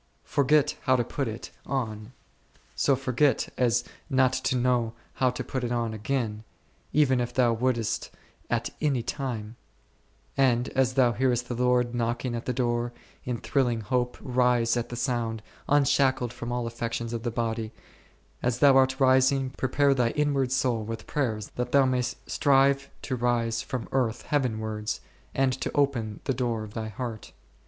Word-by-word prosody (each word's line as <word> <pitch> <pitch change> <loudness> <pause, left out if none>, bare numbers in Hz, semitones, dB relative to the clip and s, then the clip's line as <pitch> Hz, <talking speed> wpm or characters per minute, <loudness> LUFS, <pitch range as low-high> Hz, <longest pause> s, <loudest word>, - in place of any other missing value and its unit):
Forget 145 +1 +2
how 130 - +5
to 120 - +2
put 135 +3 -3
it 105 -6 -6
on, 110 -3 -3 0.6
so 140 - +2
forget 130 0 +1
as 120 -1 +2 0.3
not 130 -2 +3
to - - 0
know 120 -2 +1 0.3
how 130 - +5
to 125 - -4
put 130 -1 -4
it 120 - -2
on 115 -2 -1
again, 110 -1 -2 0.5
even 135 -4 +3
if 120 - -4
thou 120 -2 +4
wouldst 115 -2 -1 0.4
at 120 0 -1
any 140 -6 +1
time; 120 -4 -4 0.8
and 125 -2 +2
as 130 -1 +1
thou 125 -3 +5
hearest 125 0 0
the - - -1
Lord 125 0 +2
knocking 120 +1 -1
at 120 0 -4
the - - +2
door, 120 -1 0 0.3
in 125 -1 -2
thrilling 120 -3 0
hope 125 +3 -1
rise 125 -2 +2
at 120 -1 -2
the 120 - -5
sound, 115 -3 -2 0.3
unshackled 135 -3 +3
from 120 0 -5
all 120 -1 -1
affections 115 0 -3
of 115 - -3
the 120 - -2
body; 115 -1 -2 0.7
as 120 -1 0
thou 140 +1 +6
art 130 +1 +3
rising, 130 0 +4
pre 130 -1 -3
pare 140 +1 +4
thy 125 -3 +2
inward 140 -3 +1
soul 125 -4 +1
with 115 +1 -6
prayers 110 -8 -2
that 125 0 -2
thou 140 -1 +6
mayst 125 -1 0
strive 140 0 +3
to 130 - -2
rise 115 -1 0
from 130 -3 -4
earth 120 -4 0
heavenwards, 110 -6 -1 0.4
and 135 -1 +2
to 130 - -3
open 120 -8 0
the 135 - 0
door 120 -3 -1
of 105 -1 -10
thy 110 -1 -4
heart. 110 +1 -6
125 Hz, 165 wpm, -27 LUFS, 115-130 Hz, 0.8 s, thou